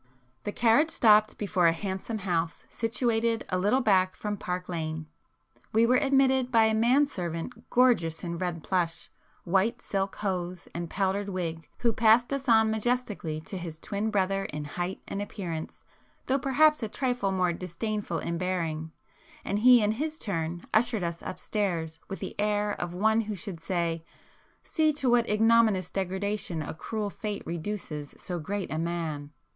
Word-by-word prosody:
The 205 - -1
carriage 240 +9 +4
stopped 215 -6 +5
before 190 -4 +2
a - - +6
handsome 190 +5 -4
house 170 -4 -2
situated 230 0 0
a 185 - 0
little 210 +8 +3
back 185 -5 +3
from 210 -1 -3
Park 180 -2 -4
Lane. 160 -2 -3 0.7
We 225 +1 +5
were 250 +2 +4
admitted 265 -2 +3
by 225 -2 +5
a 220 - +2
man 245 +6 +4
servant 185 - -5
gorgeous 235 -11 +3
in 170 -1 -4
red 175 -3 -3
plush, 175 -3 -1 0.3
white 195 +7 +1
silk 195 -4 -2
hose 180 -3 -3
and 170 -1 -4
powdered 200 +2 0
wig, 165 -4 -4
who 235 -2 +1
passed 230 +4 +4
us 275 -2 -2
on 220 -1 +5
majestically 220 -8 -1
to 190 +4 -6
his 165 -3 -6
twin 205 +6 -2
brother 195 -1 +1
in 150 0 -5
height 175 +5 -4
and 200 - -3
appearance, 175 -6 -5 0.4
though 270 +2 +1
perhaps 300 +3 +4
a 220 - -2
trifle 245 -5 -1
more 180 -2 +1
disdainful 190 +5 -3
in 170 0 -3
bearing, 165 -4 -2 0.5
and 200 +1 0
he 245 0 +7
in 210 - +3
his 305 +7 -3
turn 170 - -3
ushered 225 -3 +2
us 170 0 -3
upstairs 175 -5 -2
with 195 - -5
the - - -6
air 210 0 +1
of 175 -3 -4
one 220 +4 +3
who 215 -1 -4
should 190 -2 -6
say 165 -1 -1 0.6
"See 310 -2 +2
to 270 -4 0
what 240 -1 +3
ignominious 220 -3 +4
degradation 190 -3 -2
a - - -5
cruel 205 +5 -4
fate 210 0 -4
reduces 165 -4 -5
so 180 -1 -4
great 195 +4 -4
a 155 - -1
man!" 165 -4 -3
200 Hz, 165 wpm, -28 LUFS, 175-225 Hz, 0.7 s, he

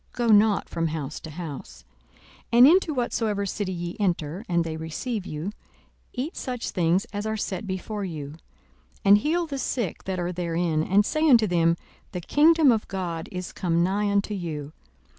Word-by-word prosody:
Go 240 -1 0
not 210 -1 +4
from 165 -1 -1
house 155 -2 -4
to 160 - -9
house. 150 - -8 0.7
42:010:008 235 - +3
And 245 +2 +10
into 340 0 +4
whatsoever 220 -4 -1
city 195 0 -3
ye 175 -1 -4
enter, 175 -2 -1
and 170 -1 +2
they 160 -1 -4
receive 180 +7 -4
you, 155 +6 -4 0.6
eat 275 +7 -4
such 250 -3 -4
things 180 +4 +2
as 205 +1 -3
are 220 0 -1
set 200 -1 -4
before 200 +2 -4
you: 155 -6 -5
42:010:009 160 - -14 0.7
And 200 +1 +8
heal 335 +8 0
the 280 -4 -5
sick 235 -8 -3
that 190 -1 -2
are 175 0 -1
therein, 170 -2 -1
and 195 +5 +3
say 310 +5 +1
unto 235 -5 +6
them, 170 -3 +2 0.4
The 180 - -3
kingdom 305 - +5
of 220 -2 0
God 175 -4 -4
is 180 -1 -6
come 170 -2 +1
nigh 200 +3 +1
unto 200 +1 0
you. 155 -6 -5
190 Hz, 180 wpm, -25 LUFS, 165-220 Hz, 0.7 s, And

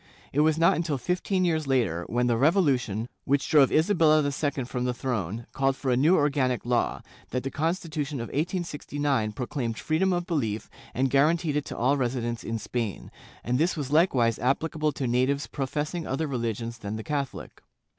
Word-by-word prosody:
It 140 - +1
was 155 +1 +4
not 165 +1 +4
until 160 -4 -1
fifteen 180 - 0
years 160 -4 0
later, 105 -11 +1
when 120 +4 +1
the 120 -1 +2
revolution, 130 - +2 0.2
which 140 0 +1
drove 145 -4 +5
Isabella 155 -2 +4
II 145 -1 -1
from 125 0 -3
the 125 -1 -1
throne, 115 -4 -3
called 135 0 +1
for 135 -1 -2
a - - +3
new 155 +9 +4
organic 135 -5 +1
law, 120 -1 0 0.3
that 125 +1 -2
the 135 - -3
Constitution 155 -3 -2
of 115 - -5
1869 145 - -1
proclaimed 120 -1 -3
freedom 175 +5 +1
of 175 -1 0
belief 115 - -2 0.2
and 130 +1 +1
guaranteed 155 +2 +3
it 150 - 0
to - - -7
all 135 +4 +2
resi 125 -1 0
dents 115 0 -3
in 115 0 -3
Spain, 115 -3 -4 0.3
and 125 +2 0
this 170 +2 +1
was 140 -2 -4
likewise 130 - +3
applicable 155 +4 0
to 135 - -3
natives 130 +4 +1
pro 135 -2 -4
fessing 155 +4 -3
other 135 +5 -1
religions 115 -3 -3
than 105 -1 -5
the 110 - -5
Catholic. 140 -1 -4
135 Hz, 185 wpm, -27 LUFS, 120-155 Hz, 0.3 s, drove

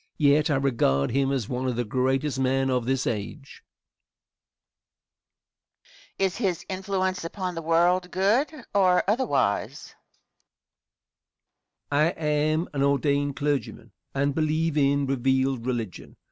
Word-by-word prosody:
Yet 150 +1 +3
I 145 - +2
regard 115 - +1
him 135 +2 +1
as 130 -6 -1
one 125 +1 -3
of 125 - -1
the 120 +1 -1
greatest 130 +4 0
men 135 0 +1
of 125 -2 0
this 135 -1 0
age. 120 +6 -5 2.5
Question. 195 - +2
Is 190 - -2
his 185 -7 -1
influence 190 -1 -2
upon 180 +2 -4
the 165 - -5
world 175 +3 +2
good 205 - +1 0.2
or 185 -3 +4
otherwise? 240 +6 0 2.0
Answer. 150 +4 +2
I - - -7
am 155 +2 +1
an 140 - -1
ordained 140 0 +1
clergyman 145 -1 -3 0.2
and 140 +1 +1
believe 155 +1 0
in 140 -1 +2
revealed 130 -1 0
religion. 115 -7 -4
145 Hz, 125 wpm, -25 LUFS, 130-170 Hz, 2.5 s, or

